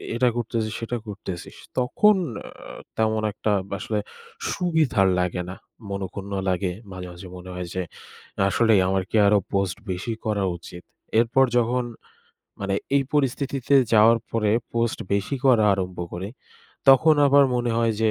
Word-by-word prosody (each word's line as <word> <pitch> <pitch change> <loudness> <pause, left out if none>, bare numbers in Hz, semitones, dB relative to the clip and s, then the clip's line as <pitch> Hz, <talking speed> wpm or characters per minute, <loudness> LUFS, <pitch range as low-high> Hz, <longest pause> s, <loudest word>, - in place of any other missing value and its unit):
এটা 125 +1 +3
করতেছিস 115 -2 -2
সেটা 120 +1 -3
করতেছিস?" 95 -4 -7 0.2
তখন 210 +12 +4 0.2
অ্যা - - -11 0.2
তেমন 110 0 +1
একটা 110 - -1 0.3
আসলে 105 +2 -2 0.5
সুবিধার 155 - +2
লাগে 90 0 -1
না, 95 - -6 0.3
মনঃক্ষুণ্ণ 100 0 -5 0.2
লাগে। 90 0 0 0.2
মাঝে, 90 -1 -7
মাঝে 90 +2 -10
মনে 90 +1 -10
হয় 90 -1 -5
যে 95 - -1 0.7
আসলেই 110 -1 +4
আমার 95 0 +1
কি - - -2
আরও 105 0 +5
post 95 -2 0
বেশি 95 +6 -3
করা 105 -2 0
উচিত? 85 +1 -11 0.4
এরপর 120 +3 +4
যখন 120 +1 +1 0.8
মানে 100 -1 -1 0.2
এই 140 - +3
পরিস্থিতিতে 140 -1 0 0.2
যাওয়ার 110 +2 +6
পরে 110 -2 +1 0.2
post 115 -1 0 0.2
বেশি 100 +8 -1
করা 120 -5 +5
আরম্ভ 95 -2 -4 0.2
করি, 95 +4 -5 0.6
তখন 155 +4 +7
আবার 140 0 +6
মনে 120 -1 0
হয় 115 -1 +2
যে 110 - +4
110 Hz, 145 wpm, -24 LUFS, 95-120 Hz, 0.8 s, তখন